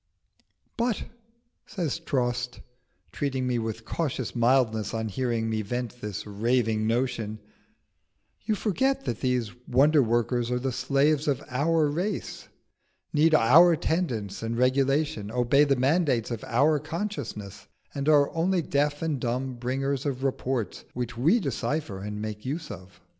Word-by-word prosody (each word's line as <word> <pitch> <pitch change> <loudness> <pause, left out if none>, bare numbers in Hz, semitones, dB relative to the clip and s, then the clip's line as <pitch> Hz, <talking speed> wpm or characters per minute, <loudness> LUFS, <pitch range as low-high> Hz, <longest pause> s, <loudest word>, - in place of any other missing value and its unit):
"But," 235 -2 0 0.6
says 175 -8 -2
Trost, 125 -6 -2 0.5
treating 135 -3 -2
me 125 -1 0
with 115 0 -4
cautious 135 -8 -3
mildness 115 -3 +2
on 110 -1 -2
hearing 115 0 -1
me 110 -1 -1
vent 120 +3 -4
this 105 -2 -5
raving 110 +1 0
notion, 115 -2 -1 1.1
"you 215 0 0
forget 265 +7 0
that 115 - -2
these 125 -4 0 0.2
wonder 145 +4 +5
workers 120 0 +1
are 125 - 0
the 130 +1 -2
slaves 140 +4 +1
of 140 -4 0
our 155 +4 +2
race, 180 +7 -3 0.7
need 155 +1 +4
our 165 +8 +7
tendance 120 - -2
and 115 +1 -3
regulation, 135 -3 +1
obey 125 +5 +3
the 140 -1 +2
mandates 135 -3 +1
of 115 -2 -4
our 145 +6 +3
consciousness, 150 - -5 0.3
and 140 +1 -1
are 145 -2 +5
only 175 +1 +1
deaf 145 +1 0
and 155 -4 -1
dumb 125 +2 -2
bringers 135 +3 -2
of 135 -1 -3
reports 130 -5 -2
which 120 -1 -3
we 160 - +3
decipher 145 - -2
and 105 +1 -5
make 105 0 -5
use 150 +1 -4
of. 95 -2 -11
130 Hz, 140 wpm, -27 LUFS, 115-150 Hz, 1.1 s, our